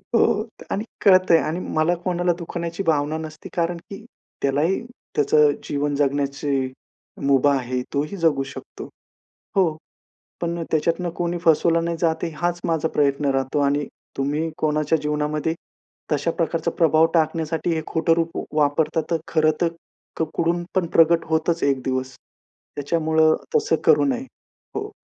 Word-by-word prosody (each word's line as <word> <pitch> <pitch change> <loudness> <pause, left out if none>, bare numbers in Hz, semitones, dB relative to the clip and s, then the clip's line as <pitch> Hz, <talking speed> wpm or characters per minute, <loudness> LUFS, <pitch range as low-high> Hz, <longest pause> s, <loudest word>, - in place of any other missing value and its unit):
हो 215 -2 +3 0.3
आणि 205 - -1 0.2
कळतंय 185 -4 +6
आणि 160 +3 -2 0.2
मला 155 +3 +3
कोणाला 175 -1 +1
दुखवण्याची 170 +1 -4
भावना 155 -2 +1
नसते, 155 -1 -8
कारण 170 0 0
की 200 +2 -9 0.4
त्यालाही, 145 +7 +1 0.3
त्याचं 150 +1 +4
जीवन 145 0 -1
जगण्याची 140 -1 0 0.5
मुभा 140 +1 +4
आहे, 125 0 -2
तोही 150 +7 -2
जगू 160 -6 +2
शकतो. 135 - -9 0.7
हो, 170 -5 +3 0.7
पण 170 0 -2
त्याच्यातनं 165 +3 +1
कोणी 175 0 -1
फसवला 165 +1 +4
नाही 170 0 -2
जात, 160 -2 +1
हाच 175 +2 -1
माझा 160 -1 +1
प्रयत्न 145 0 +1
राहतो 135 +2 0
आणि 140 +1 +1 0.3
तुम्ही 145 +4 -1
कोणाच्या 155 +1 +1
जीवनामध्ये, 150 +1 -1 0.6
तशा 150 +3 +1
प्रकारचा 165 0 -1
प्रभाव 160 -1 +5
टाकण्यासाठी 160 0 0
हे 160 - -1
खोटं 165 0 +2
रूप 165 0 0 0.3
वापरतात, 150 +2 +2
तर 165 - +3
खरंतर, 155 +2 +2 0.7
कुडून 170 +1 0
पण 185 -2 +2
प्रकट 165 0 +5
होतच 160 +1 +1
एक 135 -2 +2
दिवस. 130 0 -2 0.6
त्याच्यामुळं 160 +1 +2 0.2
तसं 440 -1 +3
करू 450 - +5
नये. 260 -2 0 0.5
हो. 420 0 -3
160 Hz, 135 wpm, -23 LUFS, 145-170 Hz, 0.7 s, कळतंय